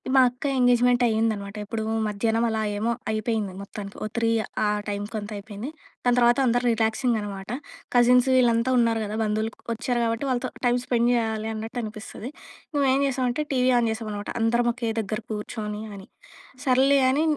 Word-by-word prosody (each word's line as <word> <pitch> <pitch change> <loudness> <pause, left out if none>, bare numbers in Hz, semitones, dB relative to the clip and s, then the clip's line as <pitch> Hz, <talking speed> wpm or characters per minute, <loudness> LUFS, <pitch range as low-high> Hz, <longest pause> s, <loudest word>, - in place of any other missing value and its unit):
మా 260 - +8
అక్క 250 +3 -10
ఎంగేజ్‌మెంట్ 245 0 +4
అయిందనమాట. 220 -3 0
ఎప్పుడు 220 +1 -3 0.2
మధ్యాహ్నం 225 +3 0
అలా 220 -1 -1 0.2
ఏమో 230 +3 0 0.2
అయిపోయింది 215 -3 -1
మొత్తానికి. 200 0 -8
ఓ - - -1
3 230 -1 +2 0.3
ఆ - - +3 0.2
టైమ్‌కి 205 +2 -4
అంతా 210 +1 -7
అయిపోయింది. 210 +5 -7 0.4
దాని 245 0 +3
తర్వాత 240 +1 +5
అందరు 245 +1 +2
రిలాక్సింగ్ 225 +1 +1
అనమాట. 200 -1 -7 0.5
కజిన్సు 250 +2 +5
వీళ్ళంతా 240 0 +3
ఉన్నారు 230 -1 +3
కదా! 210 +1 -4
బంధువులు 215 +1 -1 0.2
వచ్చారు 245 +1 -1
కాబట్టి 230 +4 -1
వాళ్ళతో 245 -1 -1 0.2
టైమ్ 245 0 +3
స్పెండ్ 240 -1 +2
చేయాలి 220 -2 0
అన్నట్టు 225 +3 -5
అనిపిస్తది. 215 +3 -7 0.4
మేము 280 -1 +3
ఏం 275 - +2
జేసామంటే 260 +1 0
టీవీ 255 0 +3
ఆన్ 230 - +1
చేశాం 220 -1 -4
అనమాట. 205 0 -5
అందరం 235 +1 +2
ఒకే 235 -2 -3
దగ్గర 215 +1 -3
కూర్చొని 210 0 -4
అని, 195 -1 -10 0.6
సర్లే 270 +2 +4
అని 295 +4 +2
230 Hz, 165 wpm, -25 LUFS, 215-245 Hz, 0.6 s, మా